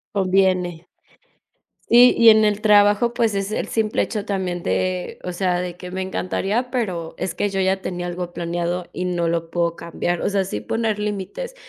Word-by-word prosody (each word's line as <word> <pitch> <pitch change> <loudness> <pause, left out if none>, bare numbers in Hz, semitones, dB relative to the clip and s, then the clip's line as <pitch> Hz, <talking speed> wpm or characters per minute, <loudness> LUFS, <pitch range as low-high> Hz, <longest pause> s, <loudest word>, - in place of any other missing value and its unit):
Conviene. 185 -3 +1 1.0
Sí, 245 +1 +7
y 230 -1 +7
en 220 -1 +6
el 210 0 0
trabajo, 210 +2 +4
pues 230 -3 +1
es 195 +1 -2
el - - -2
simple 220 -1 0
hecho 210 -3 -4
también 185 -4 -3
de, 185 0 -2
o 180 - -4
sea, 180 -1 0
de 180 -1 -4
que 180 0 -9
me 190 +1 -3
encantaría, 195 +6 -2
pero 185 -11 -3
es 190 - -3
que 205 - -1
yo 195 0 -2
ya 190 +1 +1
tenía 175 -1 -4
algo 175 0 -5
planeado 175 +1 -3
y 180 - -3
no 175 -2 0
lo 165 0 -1
puedo 170 0 0
cambiar. 170 +1 -3
O - - 0
sea, 195 -2 0
sí 105 - -4
poner 220 - -1
límites 210 - -4
190 Hz, 190 wpm, -21 LUFS, 175-210 Hz, 1.0 s, Sí